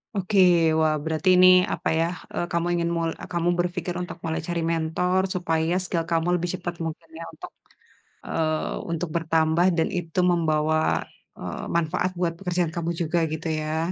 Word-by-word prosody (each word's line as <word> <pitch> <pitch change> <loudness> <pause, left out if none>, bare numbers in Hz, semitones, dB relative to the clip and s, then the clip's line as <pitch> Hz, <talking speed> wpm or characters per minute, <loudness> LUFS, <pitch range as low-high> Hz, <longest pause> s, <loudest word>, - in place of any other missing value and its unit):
Oke. 195 +1 -1 0.4
Wah, 155 -1 +3
berarti 160 +3 0
ini 185 0 +8 0.3
apa - - -2
ya, 165 +1 +2 0.2
eee, - - -1
kamu 170 0 0
ingin 170 0 0
mul 165 0 0 0.2
kamu 170 0 +1
berpikir 175 0 -1
untuk 180 - -6
mulai 165 -1 -2
cari 175 -1 -1
mentor 165 +3 0
supaya 165 -3 -1
skill 170 -2 -2
kamu 165 0 +1
lebih 175 +1 -3
cepat 175 -1 -4
mungkin 165 0 -7
ya 165 - -7
untuk, - - -10 0.7
eee, 155 -1 -1 0.2
untuk 165 +1 -2
bertambah 160 +1 +2
dan 160 - +2
itu 175 -1 -3
membawa, 155 -2 +1 0.3
eee, - - -6
manfaat 170 +2 0
buat 175 -1 -1
pekerjaan 180 -3 -1
kamu 170 0 -2
juga 170 +1 0
gitu 155 +1 -5
ya. 155 +2 -1
165 Hz, 165 wpm, -25 LUFS, 160-175 Hz, 0.7 s, ini